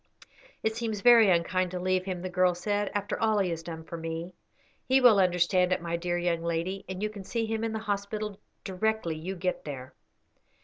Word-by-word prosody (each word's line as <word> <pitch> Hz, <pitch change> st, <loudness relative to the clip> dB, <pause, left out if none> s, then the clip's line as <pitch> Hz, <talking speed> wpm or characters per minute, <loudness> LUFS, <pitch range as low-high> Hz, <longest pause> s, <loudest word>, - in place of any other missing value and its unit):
"It 220 Hz, 0 st, 0 dB
seems 225 Hz, -3 st, -3 dB
very 235 Hz, -3 st, +7 dB
unkind 185 Hz, +1 st, +2 dB
to 180 Hz, 0 st, -4 dB
leave 185 Hz, 0 st, 0 dB
him," 180 Hz, -2 st, -4 dB
the -, -, -2 dB
girl 180 Hz, 0 st, +2 dB
said, 205 Hz, +3 st, -1 dB
"after 205 Hz, -1 st, -2 dB
all 220 Hz, -1 st, +3 dB
he 190 Hz, -3 st, +1 dB
has 165 Hz, -1 st, -3 dB
done 165 Hz, -1 st, -7 dB
for 170 Hz, +1 st, -7 dB
me." 165 Hz, +2 st, -5 dB, 0.5 s
"He 265 Hz, +1 st, +5 dB
will 240 Hz, -6 st, +7 dB
understand 180 Hz, 0 st, +3 dB
it, 185 Hz, -, +2 dB
my 170 Hz, 0 st, -3 dB
dear 175 Hz, +1 st, -1 dB
young 175 Hz, -1 st, 0 dB
lady, 170 Hz, +4 st, -2 dB
and 190 Hz, +2 st, -4 dB
you 215 Hz, -, 0 dB
can 205 Hz, -2 st, -9 dB
see 225 Hz, +4 st, -2 dB
him 220 Hz, 0 st, -2 dB
in 225 Hz, -, -1 dB
the 220 Hz, -, -2 dB
hospital 210 Hz, -1 st, -3 dB, 0.2 s
directly 195 Hz, -3 st, -1 dB
you 175 Hz, +5 st, -5 dB
get 180 Hz, 0 st, -2 dB
there." 130 Hz, -3 st, -7 dB
185 Hz, 210 wpm, -28 LUFS, 175-210 Hz, 0.5 s, very